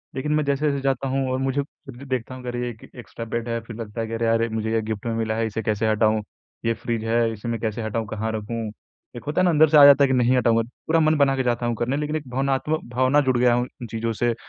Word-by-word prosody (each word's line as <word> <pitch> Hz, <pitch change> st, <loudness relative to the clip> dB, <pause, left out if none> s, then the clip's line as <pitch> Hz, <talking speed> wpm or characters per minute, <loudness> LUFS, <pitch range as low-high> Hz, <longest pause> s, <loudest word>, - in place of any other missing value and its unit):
लेकिन 140 Hz, +3 st, -2 dB
मैं 155 Hz, 0 st, +2 dB
जैसे-जैसे 140 Hz, 0 st, 0 dB
जाता 135 Hz, -1 st, 0 dB
हूँ 135 Hz, 0 st, -1 dB
और 130 Hz, -, 0 dB
मुझे 135 Hz, +1 st, 0 dB
खुद 135 Hz, -2 st, -14 dB
भी 140 Hz, -, -10 dB
देखता 130 Hz, -1 st, -3 dB
हूँ 130 Hz, -, -10 dB
कि 125 Hz, -, -4 dB
अरे! 120 Hz, 0 st, -3 dB
एक 115 Hz, -2 st, -12 dB
एक्स्ट्रा 120 Hz, -2 st, -8 dB
बेड 115 Hz, +1 st, -3 dB
है 115 Hz, 0 st, -1 dB
फिर 115 Hz, 0 st, -10 dB
लगता 115 Hz, 0 st, -5 dB
है 115 Hz, -, -3 dB
कि 115 Hz, -, -6 dB
अरे 115 Hz, 0 st, -1 dB
यार 115 Hz, 0 st, +2 dB
मुझे 110 Hz, 0 st, -2 dB
ये 115 Hz, -, +2 dB
गिफ्ट 110 Hz, -1 st, -5 dB
में 115 Hz, -, -1 dB
मिला 110 Hz, -1 st, -1 dB
है 115 Hz, 0 st, 0 dB
इसे 110 Hz, +1 st, -4 dB
कैसे 110 Hz, 0 st, 0 dB
हटाऊँ, 110 Hz, 0 st, +2 dB, 0.4 s
ये 115 Hz, -, +2 dB
फ्रिज 115 Hz, -1 st, -3 dB
है 115 Hz, 0 st, +2 dB
इसे 110 Hz, +1 st, -8 dB
मैं 115 Hz, -1 st, -2 dB
कैसे 110 Hz, 0 st, -3 dB
हटाऊँ? 110 Hz, 0 st, -3 dB
कहाँ 110 Hz, +1 st, -3 dB
रखूँ? 110 Hz, 0 st, -4 dB, 0.4 s
एक 120 Hz, -, -8 dB
होता 155 Hz, +5 st, +1 dB
है -, -, +3 dB
ना -, -, +4 dB
अंदर 155 Hz, -1 st, +5 dB
से 155 Hz, -, +5 dB
आ 145 Hz, -, +9 dB
जाता 140 Hz, 0 st, +8 dB
है -, -, +5 dB
कि 130 Hz, -, +1 dB
नहीं 125 Hz, 0 st, +3 dB
हटाऊँगा, 115 Hz, -2 st, +3 dB, 0.3 s
पूरा 165 Hz, +1 st, +3 dB
मन 155 Hz, 0 st, +3 dB
बना 140 Hz, -1 st, +3 dB
के 130 Hz, -, 0 dB
जाता 120 Hz, -1 st, 0 dB
हूँ 120 Hz, 0 st, 0 dB
करने, 125 Hz, +4 st, 0 dB
लेकिन 150 Hz, +1 st, -2 dB
एक 150 Hz, -3 st, -4 dB
भावनात्म 135 Hz, +4 st, 0 dB
भावना 130 Hz, +4 st, +3 dB
जुड़ 130 Hz, -3 st, +1 dB
गया 120 Hz, 0 st, +4 dB
हूँ 120 Hz, +1 st, 0 dB
उन 120 Hz, -, -5 dB
चीज़ों 115 Hz, 0 st, -2 dB
से, 120 Hz, +2 st, 0 dB
120 Hz, 290 wpm, -23 LUFS, 115-135 Hz, 0.4 s, आ